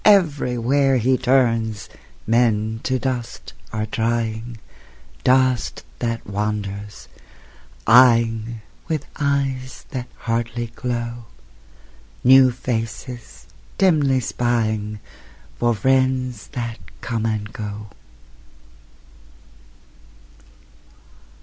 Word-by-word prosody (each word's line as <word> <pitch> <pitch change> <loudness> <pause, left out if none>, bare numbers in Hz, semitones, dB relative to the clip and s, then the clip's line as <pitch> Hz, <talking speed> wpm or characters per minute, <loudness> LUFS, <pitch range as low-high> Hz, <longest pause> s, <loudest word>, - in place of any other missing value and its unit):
Everywhere 140 - +3
he 130 +2 +3
turns, 115 -5 +1 0.4
Men 110 -1 +2
to 130 0 0
dust 125 -3 -4 0.2
are 110 0 -2
drying, 115 +1 -2 0.7
Dust 130 -1 +2 0.2
that 115 -1 -2
wanders, 105 0 -4 0.8
eying 115 -1 +5 0.3
(With 155 -3 -2
eyes 135 -3 -1
that 125 -2 -4
hardly 115 0 -2
glow) 120 -1 -3 1.0
New 130 0 +8
faces, 120 0 -5 0.3
dimly 145 -8 +3
spying 110 -3 -1 0.6
For 120 -1 +2
friends 130 0 +1
that 115 -3 -4 0.2
come 115 -2 -1
and 110 -1 -3
go. 105 -1 -6
120 Hz, 75 wpm, -22 LUFS, 110-130 Hz, 1.0 s, New